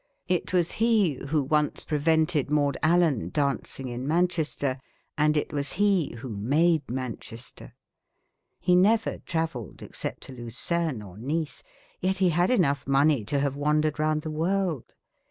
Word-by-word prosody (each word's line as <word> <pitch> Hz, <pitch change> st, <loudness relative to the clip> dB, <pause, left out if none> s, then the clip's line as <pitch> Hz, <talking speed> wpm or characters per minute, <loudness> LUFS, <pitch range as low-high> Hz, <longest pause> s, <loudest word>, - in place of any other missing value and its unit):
It 180 Hz, -2 st, -1 dB
was 175 Hz, -2 st, +2 dB
he 215 Hz, -, +2 dB
who 150 Hz, 0 st, +1 dB
once 150 Hz, +2 st, +1 dB
prevented 155 Hz, -1 st, +1 dB
Maud 145 Hz, -2 st, +2 dB
Allan 155 Hz, -, +2 dB
dancing 140 Hz, 0 st, -1 dB
in 125 Hz, +2 st, -5 dB
Manchester, 160 Hz, -5 st, 0 dB, 0.4 s
and 150 Hz, 0 st, +2 dB
it 150 Hz, -, -2 dB
was 140 Hz, -1 st, 0 dB
he 195 Hz, -, +2 dB
who 125 Hz, +3 st, -7 dB
made 145 Hz, +9 st, +1 dB
Manchester. 125 Hz, -1 st, -6 dB, 0.8 s
He 180 Hz, -, +3 dB
never 215 Hz, +4 st, +3 dB
travelled 160 Hz, -, -4 dB
except -, -, -5 dB
to -, -, -9 dB
Lucerne 125 Hz, +3 st, -2 dB
or 95 Hz, 0 st, -12 dB
Nice. 150 Hz, +5 st, -3 dB, 0.4 s
Yet 190 Hz, +1 st, 0 dB
he 185 Hz, -1 st, +3 dB
had 175 Hz, +2 st, +2 dB
enough 145 Hz, -, +2 dB
money 140 Hz, -2 st, +3 dB
to 140 Hz, -, -1 dB
have 140 Hz, -1 st, 0 dB
wandered 150 Hz, +1 st, +1 dB
round 155 Hz, 0 st, +1 dB
the 155 Hz, -, -4 dB
world. 170 Hz, -2 st, -1 dB
150 Hz, 145 wpm, -27 LUFS, 135-170 Hz, 0.8 s, He